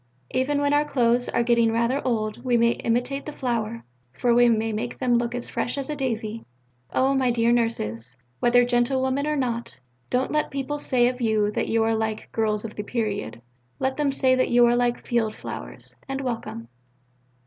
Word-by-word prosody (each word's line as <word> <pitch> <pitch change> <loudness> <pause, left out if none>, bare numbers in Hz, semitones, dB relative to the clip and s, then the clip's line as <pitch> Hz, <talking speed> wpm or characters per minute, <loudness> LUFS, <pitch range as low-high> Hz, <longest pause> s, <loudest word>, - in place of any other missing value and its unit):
Even 275 +3 +1
when 285 0 +1
our 290 0 +4
clothes 245 -4 +1
are 235 - +1
getting 235 -1 +3
rather 235 +4 +1
old 220 -1 -2
we 245 -2 +2
may 235 0 +4
imitate 245 +5 -1
the - - -3
flower: 230 -5 -3 0.3
for 240 - +1
we 240 0 +5
may 225 -1 +1
make 235 +3 -4
them 250 -2 +1
look 235 0 +1
as 245 - -4
fresh 245 - -2
as 275 +1 -3
a - - -2
daisy.... 230 -5 -3 0.5
Oh, 265 +1 +2
my 265 -2 +2
dear 235 0 +2
Nurses, 130 - -1 0.2
whether 245 0 +4
gentlewomen 260 +3 +1
or 300 - 0
not, 240 -4 -2 0.3
don't 255 +1 0
let 305 0 +1
people 275 +2 -3
say 245 -4 +3
of 250 0 -3
you 215 -2 +2
that - - -1
you 225 0 +2
are 225 0 +2
like 220 -1 -3
"Girls 215 -1 0
of 220 - -6
the 210 - -5
Period": 205 - -3 0.3
let 265 0 -1
them 290 -2 +1
say 265 -1 +2
that 255 0 +2
you 240 0 +6
are 240 0 +3
like 245 0 0
"field 225 -3 0
flowers," - - -8
and 270 0 -2
welcome. 230 - -4
240 Hz, 195 wpm, -24 LUFS, 225-260 Hz, 0.5 s, you